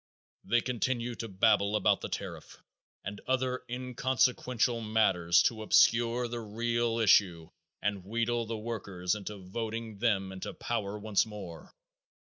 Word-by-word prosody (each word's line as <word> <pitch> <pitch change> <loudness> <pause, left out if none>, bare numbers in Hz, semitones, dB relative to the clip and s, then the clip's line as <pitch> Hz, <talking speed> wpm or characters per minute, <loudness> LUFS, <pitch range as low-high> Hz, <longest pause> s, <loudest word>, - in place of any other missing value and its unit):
They 120 0 +2
continue 120 0 -1
to 115 - -6
babble 100 +1 +2
about 105 - +2
the - - -5
tariff - - -6 0.5
and 100 0 -6
other 130 -1 0
inconsequential 125 -1 0
matters 95 -6 +3
to 110 -2 0
obscure 120 +2 +3
the 120 0 -5
real 115 +1 -1
issue 90 -7 +3 0.3
and 100 -2 -1
wheedle 115 +3 -1
the 115 0 -3
workers 100 -5 -3
into 105 0 -5
voting 110 +2 -5
them 100 -4 +1
into 95 0 -7
power 105 -3 -3
once 105 0 +1
more. 100 -6 -9
110 Hz, 130 wpm, -30 LUFS, 100-120 Hz, 0.5 s, matters